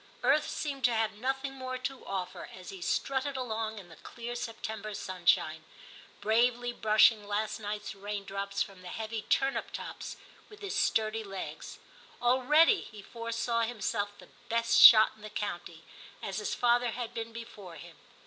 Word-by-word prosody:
Earth 295 +3 +3
seemed 280 -3 -4
to 240 -1 +4
have 220 -1 +1
nothing 265 +5 -2
more 255 -1 -5
to 255 +1 -5
offer 190 -2 -4
as 185 -1 -9
he 190 -2 -9
strutted 270 +7 -1
II 255 - -1
TIM - - -8
19 - - -4
along 220 0 -2
in 190 -4 -10
the 160 - -13
clear 240 0 -7
September 220 -3 -5
sunshine, 180 -3 +1 0.6
bravely 240 +2 +2
brushing 215 -1 +4
last 210 +2 -1
night's 210 0 -4
raindrops 200 0 -3
from 195 -2 -13
the 180 - -10
heavy 220 +3 -4
turnip 270 +5 0
tops - - -7 0.3
with 420 0 -14
his 400 -2 -4
sturdy 220 0 +1
legs; 195 -2 -7 0.4
already 280 - +4
he 210 -2 -11
foresaw 230 +1 -2
himself 205 -3 -2
the - - -15 0.2
best 230 0 +3
shot 220 -2 +10
in 215 - -20
the 215 - -8
county, 175 -5 -5 0.4
as 195 +1 -4
his 210 - -2
father 240 0 +3
had 235 0 -5
been 230 0 -5
before 220 -6 -9
him. 150 - -12
225 Hz, 170 wpm, -30 LUFS, 205-245 Hz, 0.6 s, shot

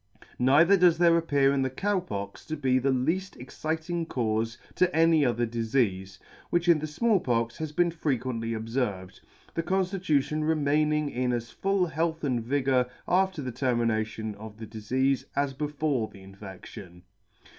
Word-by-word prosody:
Neither 155 +10 +5
does 175 -2 +5
there 170 -1 +5
appear 140 -4 +2
in 140 - +1
the 130 - 0
Cow 195 +9 0
Pox 100 - -6
to 155 - -3
be 130 -2 +2
the 135 +2 0
lead: 160 +10 0
exciting 160 +6 -4
caufe 115 -3 -1 0.2
to 185 -2 +1
any 165 -1 +4
other 120 -2 +1
difeafe, 110 -5 -1 0.3
which 175 +1 0
in 170 -3 +5
the 155 - -4
Small 210 +7 +2
Pox 115 -5 -1
has 155 -1 -4
been 175 +3 +2
frequently 130 -7 -2
obferved, 110 -5 -3 0.3
the 165 - -1
conftitution 180 -5 0
remaining 150 -1 +1
in 125 0 -1
as 120 -1 -3
full 195 - 0
health 160 0 -2
and 125 -5 0
vigour 130 0 +1 0.2
after 185 -4 +1
the 130 - -4
termination 110 -3 -1
of 105 0 -10
the 110 - -7
difeafe 130 +5 -1
as 140 -1 0
before 145 -4 -1
the 95 - -14
infection. 95 -2 -11
135 Hz, 155 wpm, -27 LUFS, 115-160 Hz, 0.3 s, Neither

